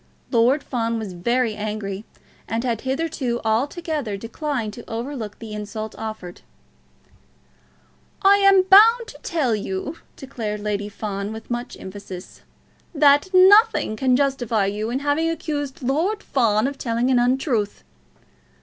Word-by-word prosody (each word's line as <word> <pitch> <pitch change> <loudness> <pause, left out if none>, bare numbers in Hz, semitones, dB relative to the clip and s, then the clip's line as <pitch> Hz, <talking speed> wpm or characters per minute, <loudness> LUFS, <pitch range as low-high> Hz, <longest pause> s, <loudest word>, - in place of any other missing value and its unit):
Lord 255 +4 +3
Fawn 230 -2 -2
was 215 -4 -5
very 235 +6 0
angry, 210 -1 -5 0.4
and 225 +1 -2
had 235 -3 -1
hitherto 265 -3 -2
altogether 275 - -1
declined 230 0 -4
to 235 - -11
overlook 230 -2 -5
the 225 -2 -9
insult 210 +1 -5
offered. 215 -5 -7 1.8
"I 395 +1 +7
am 395 -1 +5
bound 450 +5 +6
to - - -12
tell 295 -9 0
you," 200 - -4 0.2
declared 225 -6 -5
Lady 205 0 -2
Fawn, 200 -1 -4
with 220 +2 -9
much 240 +1 -4
emphasis, 190 -1 -9 0.5
"that 290 +2 +5
nothing 380 - +5
can 255 +3 +2
justify 250 -6 +1
you 210 +3 -2
in 255 +3 -2
having 290 +3 +1
accused 290 -4 -4
Lord 335 - 0
Fawn 225 -4 +2
of 275 0 -3
telling 235 +2 0
an 250 - +4
untruth. 245 -4 0
240 Hz, 130 wpm, -22 LUFS, 215-290 Hz, 1.8 s, I